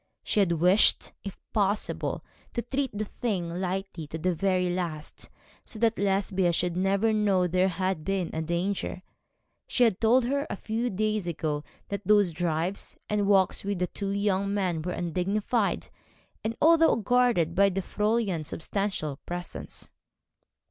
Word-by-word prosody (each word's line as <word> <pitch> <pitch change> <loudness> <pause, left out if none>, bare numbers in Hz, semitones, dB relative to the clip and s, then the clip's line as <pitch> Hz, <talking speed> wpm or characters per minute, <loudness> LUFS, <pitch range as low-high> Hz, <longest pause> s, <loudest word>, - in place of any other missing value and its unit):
She - - 0
had 185 -4 +3
wished, 180 +5 +4
if 195 - -7 0.2
possible, 205 0 -1 0.3
to 235 - -1
treat 270 +2 -1
the 210 +1 -3
thing 200 -5 -2
lightly 185 -3 -3
to 160 - -5
the 180 +3 0
very 185 +1 +1
last, 175 -4 -4 0.3
so - - -10
that 230 0 +1
Lesbia 195 -2 +1
should 175 0 -1
never 195 +4 +2
know 200 -4 +2
there 185 +2 +2
had 185 -2 -1
been 195 -2 -1 0.2
danger. 180 +1 -2 0.6
She 250 - +2
had 220 -5 +2
told 235 +2 +4
her, 280 +3 -1
a - - -2
few 225 +4 -2
days 215 -1 -1
ago, 155 -3 -2 0.3
that 200 -1 -3
those 205 -2 +4
drives, 170 +3 -2
and 205 -1 +1
walks 195 -2 +3
with 200 0 -2
the 180 - +1
two 195 +2 -5
young 200 -1 0
men 185 -5 0
were 180 +3 -3
undignified, 195 +6 -1 0.5
even 225 +1 -2
although 325 0 +5
guarded 230 -7 +2
by 200 +2 +4
the 195 0 -2
Fräulein's 210 -6 0
substantial 165 -4 -2
presence. 175 0 -6
195 Hz, 150 wpm, -27 LUFS, 175-210 Hz, 0.6 s, although